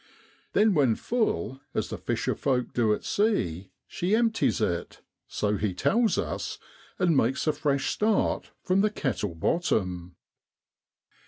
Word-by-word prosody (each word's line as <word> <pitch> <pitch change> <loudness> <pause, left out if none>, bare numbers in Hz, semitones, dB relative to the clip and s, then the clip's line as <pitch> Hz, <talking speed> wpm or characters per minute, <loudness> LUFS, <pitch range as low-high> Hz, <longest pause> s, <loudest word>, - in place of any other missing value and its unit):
Then 210 0 +4
when 135 -9 +3
full, 135 - -1
as - - -1
the - - -4
fisher - - -1
folk 125 -3 -1
do 115 -3 +2
at 105 - -1
sea, 100 - 0 0.2
she 185 +5 0
empties 225 - +2
it, 85 -6 -2 0.3
so 105 0 -1
he 100 -2 -1
tells 225 - +2
us, - - -3 0.4
and 175 -4 +2
makes 135 +1 +1
a 155 - +2
fresh 145 -2 0
start 215 0 +1
from 185 +1 +2
the 215 - +3
kettle 120 - -2
bottom. 90 - -1
135 Hz, 140 wpm, -27 LUFS, -, 0.4 s, Then